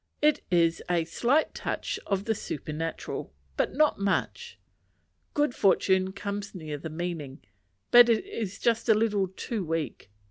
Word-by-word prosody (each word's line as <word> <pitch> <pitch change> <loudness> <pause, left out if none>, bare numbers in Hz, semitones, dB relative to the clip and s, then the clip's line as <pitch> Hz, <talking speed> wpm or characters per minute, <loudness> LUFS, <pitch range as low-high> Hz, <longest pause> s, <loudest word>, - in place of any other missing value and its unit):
It 300 -1 +3
has 170 -1 +3
a 170 -2 +2
slight 250 - +1
touch - - -3
of 195 0 -1
the 225 - +1
supernatural, 160 -3 -5 0.2
but - - 0
not 305 -4 +3
much. 470 - -1 0.8
Good 295 -3 +2
fortune 190 -2 +3
comes 200 +1 -5
near 155 -4 -5
the 160 - -6
meaning, 155 -4 -5 0.5
but 240 0 +9
is 225 - -1
just 230 0 0
a 220 - +7
little 210 -3 +1
too 200 +3 -4
weak. 160 - -3
195 Hz, 140 wpm, -28 LUFS, 165-230 Hz, 0.8 s, but